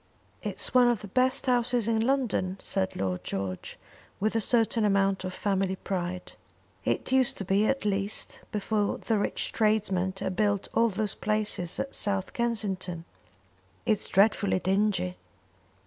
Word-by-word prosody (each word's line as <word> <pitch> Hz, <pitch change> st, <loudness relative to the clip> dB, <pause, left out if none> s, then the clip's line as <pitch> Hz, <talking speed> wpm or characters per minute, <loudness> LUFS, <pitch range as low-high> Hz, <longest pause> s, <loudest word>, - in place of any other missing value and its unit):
"It's -, -, -2 dB
one 250 Hz, -1 st, +6 dB
of 240 Hz, -3 st, +1 dB
the 205 Hz, -, -7 dB
best 255 Hz, +6 st, +2 dB
houses 245 Hz, -2 st, +1 dB
in 225 Hz, -1 st, +2 dB
London," 225 Hz, -7 st, 0 dB
said 190 Hz, -1 st, -1 dB
Lord 95 Hz, -2 st, -2 dB
George, 95 Hz, -2 st, -4 dB, 0.4 s
with 215 Hz, +2 st, 0 dB
a 225 Hz, -, +2 dB
certain 225 Hz, 0 st, +2 dB
amount 195 Hz, -2 st, +2 dB
of 185 Hz, -, -3 dB
family 190 Hz, -1 st, 0 dB
pride. 180 Hz, -1 st, -4 dB, 0.5 s
"It -, -, -1 dB
used 260 Hz, -1 st, +3 dB
to 195 Hz, -, -3 dB
be, 200 Hz, +3 st, +2 dB
at 270 Hz, -4 st, 0 dB
least, 200 Hz, +1 st, -1 dB
before 210 Hz, 0 st, 0 dB
the 225 Hz, -3 st, 0 dB
rich -, -, -1 dB
tradesmen 195 Hz, -4 st, +1 dB
had 185 Hz, -, -3 dB
built 205 Hz, -1 st, +1 dB
all 230 Hz, 0 st, +4 dB
those 210 Hz, 0 st, -1 dB
palaces 210 Hz, -5 st, -1 dB
at 275 Hz, -, -3 dB
South 200 Hz, -2 st, -1 dB
Kensington." 195 Hz, -8 st, -2 dB, 0.8 s
"It's 215 Hz, -2 st, +1 dB
dreadfully 200 Hz, 0 st, +3 dB
dingy." 185 Hz, -1 st, 0 dB
205 Hz, 145 wpm, -28 LUFS, 190-225 Hz, 0.8 s, one